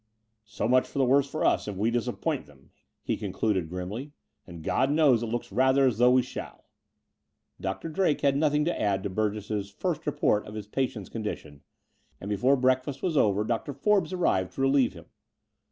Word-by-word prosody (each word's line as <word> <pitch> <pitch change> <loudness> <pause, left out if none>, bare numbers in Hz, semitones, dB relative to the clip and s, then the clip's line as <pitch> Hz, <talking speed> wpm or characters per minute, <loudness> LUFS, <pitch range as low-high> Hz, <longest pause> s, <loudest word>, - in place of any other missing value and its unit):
And 110 - -48 0.4
so 105 0 -3
much 125 +1 +2
the 135 -1 +2
worse 140 +2 +3
for 155 - -2
us - - +2
if 105 - -4
we 110 +5 0
disappoint 120 -2 -2
them," - - -21 0.3
he - - -1
concluded 95 -7 -1
grimly; 100 - -6 0.3
and 85 -3 -10
God 130 +10 +1
knows 145 -6 +4
it 120 - -2
looks 120 -1 -4
rather 130 +5 +3
like 130 - +5
as 110 - -8
though 125 0 +6
we 130 0 +4
shall! - - -8 0.5
" - - -31
Dr. 95 +11 -3
Drake 165 -2 0
had 140 -1 +3
nothing 150 0 +2
to 175 - -1
add 100 -2 0
to 100 - -3
Burgess's 105 0 -2
first 160 - -3
report 105 -7 +1
of 105 - -9
his 105 -2 -5
patient's 110 -3 -3
condition: 105 -10 -6 0.6
and 100 - -7
before 125 +7 +3
break 130 0 +2
fast 135 0 -7
was 175 -4 0
over 105 -6 +3
Dr. 115 +5 -2
Forbes 190 +4 +1
arrived 95 - 0
to - - -4
relieve 135 -2 +3
him. 85 -2 -12
120 Hz, 200 wpm, -27 LUFS, 105-140 Hz, 0.6 s, though